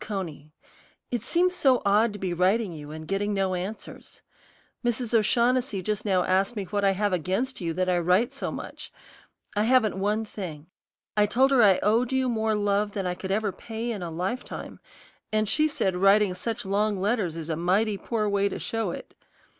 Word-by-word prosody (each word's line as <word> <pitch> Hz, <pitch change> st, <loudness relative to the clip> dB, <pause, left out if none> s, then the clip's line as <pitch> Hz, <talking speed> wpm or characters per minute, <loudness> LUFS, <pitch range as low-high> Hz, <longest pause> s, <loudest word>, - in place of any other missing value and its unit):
CONEY, 170 Hz, -8 st, -5 dB, 0.6 s
It 240 Hz, -3 st, -1 dB
seems 350 Hz, +9 st, +2 dB
so 265 Hz, -7 st, +3 dB
odd 210 Hz, +3 st, +4 dB
to -, -, -6 dB
be 185 Hz, -3 st, -2 dB
writing 185 Hz, +3 st, +1 dB
you 150 Hz, -2 st, -9 dB
and 155 Hz, +1 st, -8 dB
getting 205 Hz, +2 st, -1 dB
no 190 Hz, -1 st, 0 dB
answers. 185 Hz, +4 st, -6 dB, 0.6 s
Mrs. 240 Hz, 0 st, -1 dB
O'Shaughnessy 235 Hz, -1 st, +2 dB
just 210 Hz, +2 st, -2 dB
now 185 Hz, -3 st, +2 dB
asked 195 Hz, +5 st, +1 dB
me 205 Hz, -, -2 dB
what 205 Hz, +2 st, -2 dB
I 195 Hz, -1 st, +4 dB
have 205 Hz, 0 st, 0 dB
against 190 Hz, -, -1 dB
you 170 Hz, -1 st, -1 dB
that 185 Hz, +2 st, 0 dB
I 180 Hz, -1 st, +2 dB
write 180 Hz, +7 st, +3 dB
you -, -, -11 dB
so -, -, -2 dB
much. -, -, -8 dB, 0.6 s
I 210 Hz, +1 st, +2 dB
haven't 225 Hz, -5 st, +3 dB
one 210 Hz, +3 st, 0 dB
thing. 170 Hz, -8 st, -7 dB, 0.5 s
I 210 Hz, 0 st, +4 dB
told 260 Hz, +5 st, +3 dB
her 265 Hz, -3 st, +5 dB
I 195 Hz, -4 st, +6 dB
owed 230 Hz, +4 st, +2 dB
you 260 Hz, -1 st, +1 dB
more 220 Hz, -2 st, 0 dB
love 205 Hz, 0 st, 0 dB
than 195 Hz, -2 st, -3 dB
I 180 Hz, -, 0 dB
could 190 Hz, +1 st, -7 dB
ever 205 Hz, +1 st, 0 dB
pay 225 Hz, +4 st, -5 dB
in 210 Hz, -4 st, -4 dB
a 175 Hz, -, -4 dB
lifetime, 185 Hz, +10 st, -5 dB, 0.5 s
and 215 Hz, 0 st, +1 dB
she 305 Hz, +8 st, +3 dB
said 195 Hz, -11 st, -1 dB
writing 195 Hz, +1 st, +4 dB
such 220 Hz, +4 st, -4 dB
long 205 Hz, +1 st, 0 dB
letters 200 Hz, -5 st, 0 dB
is 165 Hz, 0 st, -6 dB
a 160 Hz, -, 0 dB
mighty 195 Hz, +5 st, +1 dB
poor 220 Hz, -3 st, -1 dB
way 200 Hz, 0 st, +1 dB
to -, -, -5 dB
show 225 Hz, -4 st, -2 dB
it. -, -, -7 dB
205 Hz, 200 wpm, -26 LUFS, 185-225 Hz, 0.6 s, I